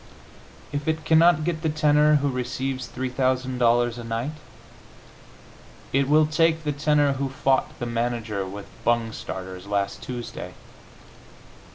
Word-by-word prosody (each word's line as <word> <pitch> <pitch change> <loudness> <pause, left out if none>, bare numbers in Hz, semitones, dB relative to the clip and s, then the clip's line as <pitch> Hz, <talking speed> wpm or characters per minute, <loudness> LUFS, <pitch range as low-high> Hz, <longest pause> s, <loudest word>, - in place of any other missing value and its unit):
If 145 +1 -4
it 160 -1 -1
cannot 160 -1 +5
get 160 -1 -2
the 160 - 0
tenor 150 0 +4
who 145 -1 +1
receives 130 0 -3
$3,000 125 -2 +1
a - - -6
night, 115 +5 -3 1.6
it 135 0 +2
will 155 +1 +5
take 160 +1 +2
the 150 - 0
tenor 145 -1 +2
who 135 0 -2
fought 135 0 0
the 120 - -4
manager 115 -3 -2
with 100 +2 -7 0.2
bung 115 -1 +1
starters 95 -2 -7
last 100 -1 -1
Tuesday. 120 -2 -7
130 Hz, 130 wpm, -24 LUFS, 120-150 Hz, 1.6 s, cannot